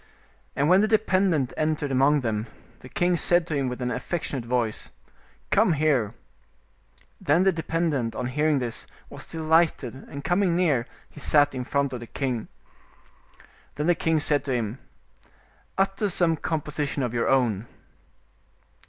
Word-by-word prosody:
And 140 +2 +1
when 185 +4 +6
the 215 - +3
dependent 190 - +2
entered 155 -2 -1
among 135 +3 +3
them, 110 -2 -2 0.3
the 130 - -12
king 175 +4 +1
said 175 0 +3
to 160 -3 -3
him 135 -2 0
with 125 0 -5
an 125 - -1
affectionate 135 -3 -3
voice, 120 -3 -2 0.6
"Come - - +4
here"; 140 -8 +1 1.1
then 160 +6 +3
the 190 - +4
dependent, 160 -7 -1
on 125 - -3
hearing 150 +4 +1
this, 120 -3 -4 0.2
was - - -9
delighted, 160 -5 +1
and 140 +2 -9
coming 180 -1 +2
near, 145 -9 +1 0.2
he - - -14
sat 145 0 +3
in 130 -1 -3
front 140 0 0
of 125 - -4
the 120 - -9
king. 125 -4 -3 1.3
Then 150 - -2
the 175 - +4
king 165 -1 +1
said 145 -2 +1
to 135 - -2
him, 115 0 -2 1.0
"Utter 195 +2 +1
some 170 -2 +2
composition 150 -3 -2
of 120 -2 -2
your 120 - 0
own." 120 -5 +1
145 Hz, 155 wpm, -25 LUFS, 125-165 Hz, 1.3 s, when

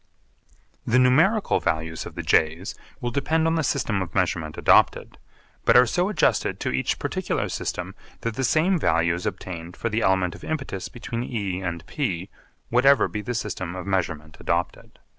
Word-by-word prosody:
The 120 - +2
numerical 155 - +4
values 80 -1 -2
of - - -11
the - - -4
J's 80 +4 +1 0.3
will 120 -1 -2
depend 160 +5 +1
on 165 - +2
the 165 - +1
system 125 -7 0
of 90 -3 -6
measurement 85 -4 0
adopted, - - +3 0.4
but - - +6
are 125 - +8
so 175 - 0
adjusted 185 -8 +1
to - - -2
each 65 0 0
particular - - -2
system - - -4 0.3
that 115 - -2
the 130 - -3
same 165 +8 +3
value 85 - +2
is 90 +1 -3
obtained 85 -1 -6
for 115 - -2
the 110 +1 0
element 95 -3 +2
of - - -12
impetus 135 -11 -4
between 120 0 -5
E 100 -7 -3
and 85 -3 -4
P, 100 - -3 0.4
whatever 135 +4 +5
be 105 - -4
the 120 +3 -4
system 95 -5 -4
of 90 - -6
measurement 80 -5 -2
adopted. 85 +1 -2
100 Hz, 175 wpm, -24 LUFS, 85-130 Hz, 0.4 s, are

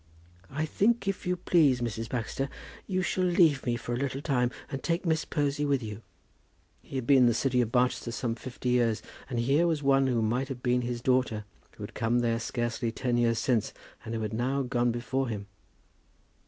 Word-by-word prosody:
"I 155 +3 -2
think, 215 +6 +1
if 195 -2 -2
you 180 - +2
please, 160 -7 +3
Mrs. 115 -2 -3
Baxter, 130 +3 -2 0.4
you 185 -2 0
shall 185 +1 0
leave 170 -6 +4
me 120 - +2
for 120 0 -4
a - - -1
little 135 0 -2
time, 125 -5 +2 0.2
and 135 - -4
take 170 +2 -1
Miss 160 -2 +1
Posy 145 -1 0
with 140 -3 +1
you." 105 0 -6 0.8
He - - -11
had 130 -3 -2
been 140 +2 +6
in 125 - +6
the 120 - +3
city 125 0 +2
of 115 -2 -1
Barchester 125 -1 +1
some 115 0 -2
fifty 125 +1 -5
years, 120 -3 +2 0.3
and 125 - -3
here 140 +8 +3
was 155 -3 0
one 135 -1 +4
who 120 -3 +1
might 125 +5 0
have 130 -3 -7
been 125 0 +2
his 120 -1 -4
daughter, 125 -5 +1 0.3
who - - -7
had - - -7
come 120 +2 +1
there 115 -1 +1
scarcely 120 0 -2
ten 120 +1 -1
years 120 -1 +2
since, 115 -4 0 0.3
and 115 - -4
who 110 -1 -1
now 125 +6 0
had 125 - -8
gone 120 -1 +2
before 130 +3 -1
him! 105 -3 -4
125 Hz, 210 wpm, -29 LUFS, 120-140 Hz, 0.8 s, been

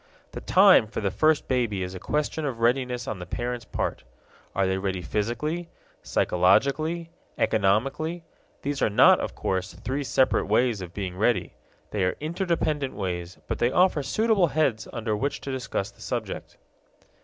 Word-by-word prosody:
The - - -7
time 110 - +6
for - - -5
the 100 -3 -1
first 155 +7 +2
baby 115 -7 0
is 90 0 -5
a 95 - -7
question 150 - -2
of 130 -5 -3
readiness 125 0 +1
on 100 - -4
the 90 - -7
parents' 120 +3 -3
part. - - -3 0.5
Are 95 - +2
they 95 0 0
ready 95 -2 -2
physically, 150 - -2 0.3
psychologically, 140 - +2 0.3
economically? 135 - +1 0.4
These 140 0 -2
are - - +3
not, 105 - +6
of - - -4
course, 95 -1 -2
three 135 +5 -3
separate 130 -1 +2
ways 120 -5 +2
of 90 -2 -7
being 95 -1 -5
ready; 100 -3 +1 0.4
they 100 -3 0
are 90 - 0
interdependent 155 -4 -1
ways, 90 -2 -4
but - - -3
they 120 - +3
offer 180 0 +3
suitable 215 +4 +2
heads 135 -7 0
under 110 -2 -2
which 140 +7 -2
to 140 - -5
discuss 125 -6 -3
the - - -21
subject. - - -5
120 Hz, 165 wpm, -26 LUFS, 95-150 Hz, 0.5 s, time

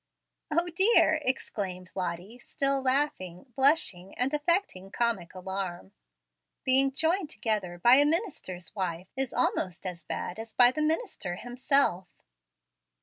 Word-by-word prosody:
"O 340 +3 +1
dear!" 345 -3 +4
exclaimed 190 -8 -3
Lottie, 185 +5 -5
still 275 +2 0
laughing, 255 - -2
blushing, 265 - +2
and 255 +4 +1
affecting 300 - 0
comic 205 -6 -2
alarm; 185 - -5 0.7
"being 270 +1 +3
joined 325 +4 0
together 210 - -2
by 240 +8 +6
a 290 - +6
minister's 295 - -3
wife 180 -2 -4
is 265 -2 -2
almost 185 -8 0
as 180 -2 -6
bad 180 - -5
as 225 0 -8
by 245 0 +6
the 305 - -3
minister 310 - -2
himself." 245 -4 +1
240 Hz, 125 wpm, -28 LUFS, 185-285 Hz, 0.7 s, by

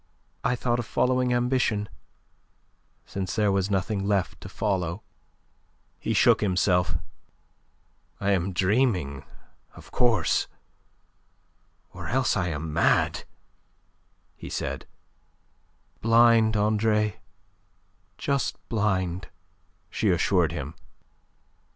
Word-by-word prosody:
"I 125 - +1
thought 120 0 0
of 120 - -4
following 125 0 +1
ambition, 120 -4 +1 1.2
since 95 -2 -4
there 105 -2 +2
was 95 0 0
nothing 100 +1 -1
left 100 -2 -1
to 95 - -8
follow." 95 -2 -2 1.0
He - - -2
shook - - +5
himself. 90 -2 +2 1.2
"I 100 0 +1
am 95 -1 +1
dreaming, 95 - +1 0.5
of - - -14
course, 115 -8 +2 1.5
or - - -7
else 130 -1 +1
I 95 -4 0
am 80 -1 -4
mad," 85 - +2 1.1
he - - -9
said. - - -4 1.1
"Blind, 115 -1 +5
Andre; 105 0 +1 1.0
just 140 -3 -1
blind," 95 -5 -1 0.6
she 110 - 0
assured 90 -2 +2
him. 75 -2 -5
100 Hz, 95 wpm, -26 LUFS, 90-115 Hz, 1.5 s, shook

